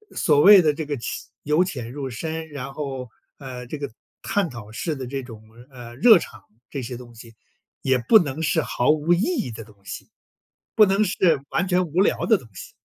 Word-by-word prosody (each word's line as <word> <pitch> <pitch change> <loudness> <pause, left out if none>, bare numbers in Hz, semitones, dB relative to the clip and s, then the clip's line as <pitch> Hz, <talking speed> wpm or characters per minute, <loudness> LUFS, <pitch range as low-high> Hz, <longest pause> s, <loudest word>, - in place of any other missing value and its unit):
所 150 -3 +3
谓 195 +4 +9
的 155 -2 +2
这 155 0 -5
个 145 - -3
浅 120 - -6
由 150 +4 +2
浅 125 -9 -6
入 140 -1 -5
深， 160 +6 -5
然 135 -2 -7
后， 135 -4 -5 0.3
呃， 130 -3 -8
这 155 - -5
个 140 -4 -5 0.3
探 200 -5 -1
讨 115 -4 -10
式 150 +8 -3
的 130 -2 -6
这 135 +2 -4
种， 115 -3 -11 0.3
呃， 120 -2 -11
热 220 - +7
场 - - -10 0.3
这 140 - -5
些 120 +1 -6
东 120 -1 -13
西， 115 0 -13 0.5
也 130 -1 +2
不 220 - +8
能 155 -3 -3
是 160 +1 +2
毫 125 -2 -1
无 155 +3 +2
意 175 - +1
义 230 - -1
的 115 0 -8
东 105 -1 -19
西， - - -8 0.7
不 215 - +7
能 195 +2 +2
是 175 -7 +2
完 190 - 0
全 180 0 +2
无 170 +5 +1
聊 - - +1
的 220 -3 +4
东 125 - -15
西。 90 - -10
145 Hz, 230 characters per minute, -23 LUFS, 125-170 Hz, 0.7 s, 谓